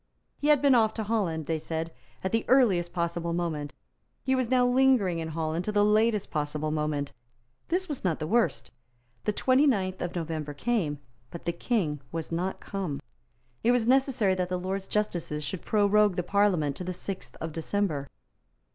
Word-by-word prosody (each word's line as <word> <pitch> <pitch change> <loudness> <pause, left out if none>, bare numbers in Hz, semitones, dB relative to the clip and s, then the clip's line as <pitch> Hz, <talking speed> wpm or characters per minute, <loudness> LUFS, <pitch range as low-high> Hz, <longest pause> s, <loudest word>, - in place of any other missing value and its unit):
He 290 - -1
had 295 -2 +5
been 280 -2 +6
off 220 -3 +3
to 220 - -2
Holland, 195 -8 -1
they 160 0 -1
said, 160 +1 -4 0.3
at 190 - -1
the 225 0 +1
earliest 200 -10 +4
possible 170 -1 -2
moment. 160 -4 -2 0.5
He 265 - +1
was 255 -3 +1
now 255 -1 +4
lingering 245 -9 +3
in 160 - -3
Holland 160 +1 -2
till 210 - -3
the 205 0 +5
latest 215 0 +2
possible 150 0 -2
moment. 150 -2 -1 0.6
This 370 +2 0
was 295 -5 -5
not 175 -5 +1
the 155 - -4
worst. 230 +8 +1 0.5
The - - +2
twenty 260 +7 +3
ninth 190 -7 0
of 175 - -3
November 155 -3 -3
came; 175 -6 0 0.3
but 170 - -9
the 170 - +1
King 170 - -1
was 165 0 -4
not 180 +3 -2
come. 185 -9 -4 0.6
It 235 - +4
was 245 -2 +2
necessary 255 -5 +3
that 180 -1 -1
the 180 - -1
Lords 190 +2 -3
Justices 175 -8 -1
should 150 +5 -4
prorogue 210 -1 +3
the 180 - -1
Parliament 180 -7 +2
to - - -5
the 180 +1 -3
sixth 190 +1 -6
of 160 - -4
December. 165 -3 -1
185 Hz, 180 wpm, -28 LUFS, 160-225 Hz, 0.6 s, been